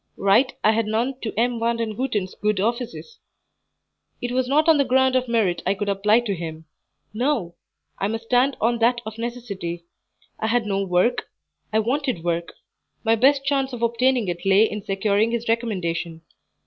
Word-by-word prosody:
Right 205 Hz, +7 st, +3 dB
I 215 Hz, -, +5 dB
had 225 Hz, 0 st, 0 dB
none 240 Hz, +5 st, -1 dB
to 220 Hz, -, -3 dB
M. 240 Hz, 0 st, +1 dB
Vandenhuten's 230 Hz, -3 st, -1 dB
good 210 Hz, -1 st, -1 dB
offices; 240 Hz, -, -3 dB, 1.0 s
it 245 Hz, -, -4 dB
was 255 Hz, 0 st, 0 dB
not 300 Hz, +4 st, +2 dB
on 320 Hz, -3 st, +5 dB
the -, -, +5 dB
ground 260 Hz, 0 st, +2 dB
of 255 Hz, 0 st, +1 dB
merit 220 Hz, -7 st, +1 dB
I 195 Hz, +2 st, +1 dB
could 205 Hz, +1 st, -3 dB
apply 210 Hz, +4 st, +3 dB
to 220 Hz, -4 st, -2 dB
him; 160 Hz, -2 st, -6 dB, 0.5 s
no, 235 Hz, -7 st, -1 dB, 0.5 s
I 195 Hz, -, 0 dB
must 225 Hz, +2 st, -3 dB
stand 250 Hz, +4 st, +2 dB
on 235 Hz, +1 st, +1 dB
that 240 Hz, +1 st, +3 dB
of 220 Hz, +1 st, -7 dB
necessity: 200 Hz, -8 st, -5 dB, 0.5 s
I 220 Hz, -, -1 dB
had 235 Hz, 0 st, +1 dB
no 195 Hz, -1 st, 0 dB
work; 180 Hz, +5 st, +1 dB, 0.4 s
I 215 Hz, -, +1 dB
wanted 250 Hz, -, -1 dB
work; 170 Hz, 0 st, -2 dB, 0.5 s
my 225 Hz, 0 st, +3 dB
best 275 Hz, +4 st, +3 dB
chance 270 Hz, -2 st, 0 dB
of 235 Hz, -1 st, -5 dB
obtaining 235 Hz, 0 st, +2 dB
it 175 Hz, -1 st, -4 dB
lay 195 Hz, +2 st, +5 dB
in 210 Hz, -1 st, -6 dB
securing 205 Hz, +2 st, +1 dB
his 235 Hz, 0 st, -3 dB
recommendation. 175 Hz, -8 st, -2 dB
225 Hz, 175 wpm, -23 LUFS, 195-245 Hz, 1.0 s, I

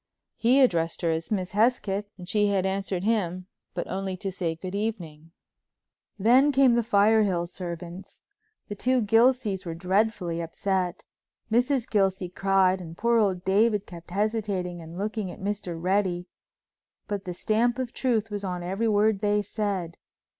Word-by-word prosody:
He 255 Hz, +4 st, +4 dB
addressed 170 Hz, -9 st, +1 dB
her 165 Hz, -, +2 dB
as 160 Hz, 0 st, -3 dB
Miss 185 Hz, -4 st, -2 dB
Hesketh 210 Hz, -2 st, +1 dB
and 180 Hz, -2 st, -10 dB
she 205 Hz, +2 st, +2 dB
had 195 Hz, -2 st, +1 dB
answered 190 Hz, -1 st, -2 dB
him, 185 Hz, -5 st, 0 dB, 0.3 s
but 175 Hz, -, -2 dB
only 190 Hz, 0 st, -3 dB
to 195 Hz, +1 st, -4 dB
say 170 Hz, -3 st, -2 dB
"Good 185 Hz, +3 st, -7 dB
evening." 175 Hz, -7 st, -4 dB, 0.9 s
Then 250 Hz, +8 st, +5 dB
came 270 Hz, -2 st, +5 dB
the 235 Hz, -, +3 dB
Firehill 205 Hz, -4 st, +3 dB
servants. 175 Hz, +1 st, -8 dB, 0.4 s
The -, -, -5 dB
two 250 Hz, +6 st, +1 dB
old 240 Hz, -4 st, +2 dB
Gilseys 225 Hz, -2 st, +3 dB
were 165 Hz, -2 st, -5 dB
dreadfully 185 Hz, -1 st, 0 dB
upset. 180 Hz, +1 st, -2 dB, 0.5 s
Mrs. 245 Hz, +2 st, +2 dB
Gilsey 190 Hz, -4 st, +1 dB
cried 190 Hz, 0 st, +2 dB
and 165 Hz, -1 st, -9 dB
poor 235 Hz, 0 st, +3 dB
old 190 Hz, -4 st, 0 dB
David 205 Hz, +1 st, +2 dB
kept 170 Hz, -1 st, -12 dB
hesitating 200 Hz, -3 st, -2 dB
and 165 Hz, +1 st, -10 dB
looking 210 Hz, 0 st, -3 dB
at -, -, -9 dB
Mr. 190 Hz, -4 st, -3 dB
Reddy, 185 Hz, 0 st, 0 dB, 0.8 s
but 205 Hz, -2 st, -4 dB
the 180 Hz, -, -4 dB
stamp 235 Hz, +5 st, +1 dB
of 255 Hz, -2 st, -4 dB
truth 225 Hz, -4 st, 0 dB
was 205 Hz, -1 st, -4 dB
on 180 Hz, -2 st, -3 dB
every 195 Hz, +6 st, -1 dB
word 210 Hz, -1 st, +3 dB
they 205 Hz, 0 st, +1 dB
said. 195 Hz, -5 st, -3 dB
195 Hz, 160 wpm, -26 LUFS, 180-220 Hz, 0.9 s, Then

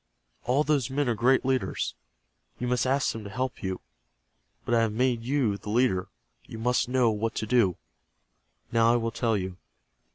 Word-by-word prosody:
All 130 Hz, +5 st, +2 dB
those 145 Hz, -5 st, +1 dB
men 140 Hz, +1 st, 0 dB
are 120 Hz, -, +2 dB
great 125 Hz, +4 st, +3 dB
leaders. 130 Hz, -1 st, -1 dB, 0.6 s
You 125 Hz, -, -3 dB
must 125 Hz, +1 st, +1 dB
ask 135 Hz, +1 st, +2 dB
them 115 Hz, -, -7 dB
to 100 Hz, -, -7 dB
help 130 Hz, +4 st, -3 dB
you. 95 Hz, -1 st, -3 dB, 0.8 s
But 120 Hz, -, -1 dB
I 115 Hz, -, +4 dB
have 115 Hz, -1 st, +1 dB
made 120 Hz, +1 st, +1 dB
you 125 Hz, -5 st, +1 dB
the 105 Hz, -, -9 dB
leader. 105 Hz, -5 st, +2 dB, 0.4 s
You 115 Hz, -, -8 dB
must 125 Hz, +2 st, +1 dB
know 125 Hz, -3 st, +3 dB
what 110 Hz, +1 st, -2 dB
to -, -, -2 dB
do. 110 Hz, -6 st, +2 dB, 0.9 s
Now 115 Hz, 0 st, +4 dB
I -, -, +3 dB
will 115 Hz, -1 st, 0 dB
tell 115 Hz, -1 st, 0 dB
you. 95 Hz, -1 st, -5 dB
120 Hz, 185 wpm, -27 LUFS, 110-130 Hz, 0.9 s, I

